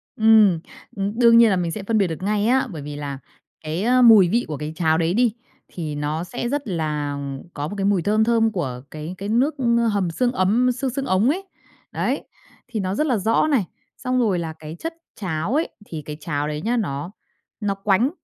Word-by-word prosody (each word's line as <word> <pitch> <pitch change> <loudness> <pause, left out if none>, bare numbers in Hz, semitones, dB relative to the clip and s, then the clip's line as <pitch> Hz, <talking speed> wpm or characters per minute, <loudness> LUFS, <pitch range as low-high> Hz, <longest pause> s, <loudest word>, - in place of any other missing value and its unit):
Ừm, 215 -6 +5 0.4
ừm, 200 +4 -3
đương 230 -1 +7
nhiên 230 -1 +7
là 190 - +2
mình 175 -2 -1
sẽ 210 - -5
phân 220 +2 0
biệt 195 -3 +3
được 165 +2 -5
ngay 210 +1 +1
á, 260 +1 +3
bởi 155 -4 -6
vì 145 0 -7
là 140 -2 -5 0.4
cái, 160 +5 -3
ơ, 250 +2 +4
mùi 215 -7 +8
vị 235 +4 +1
của 150 - -4
cái 150 +2 -5
cháo 160 -2 +2
đấy 165 +1 +1
đi, 235 -1 +2 0.3
thì 155 -4 -5
nó 150 +3 -2
sẽ 240 +6 -4
rất 285 -2 -2
là 150 -5 -2 0.4
có 145 0 -3
một 205 - -6
cái 195 - -1
mùi 200 -3 +2
thơm 215 +5 +2
thơm 225 -1 +3
của 130 -11 -3
cái 155 +4 -6
cái 200 +2 -5
nước 260 +7 +2 0.4
hầm 190 -4 0
xương 245 +7 +1
ấm 240 +4 +2
xương 260 +2 -2
xương 270 +2 -3
ống 205 +2 +2
ấy. 370 +7 -1 0.5
Đấy, - - -1 0.4
thì 220 - -4
nó 190 0 -2
rất 305 +6 +1
là 250 - +2
rõ 220 +8 +2
này, 270 -10 +2 0.3
xong 255 0 -1
rồi 205 -7 +2
là 160 -1 -4
cái 155 +1 -8
chất 330 0 -4 0.2
cháo 175 +1 -3
ấy, 320 - +1 0.2
thì 160 -5 -6
cái 150 -1 -6
cháo 145 -2 -2
đấy 150 0 -3
nhá 240 +6 0
nó 155 -4 -3 0.5
nó 205 -2 0
quánh, 200 +6 +2
195 Hz, 225 wpm, -22 LUFS, 160-235 Hz, 0.5 s, mùi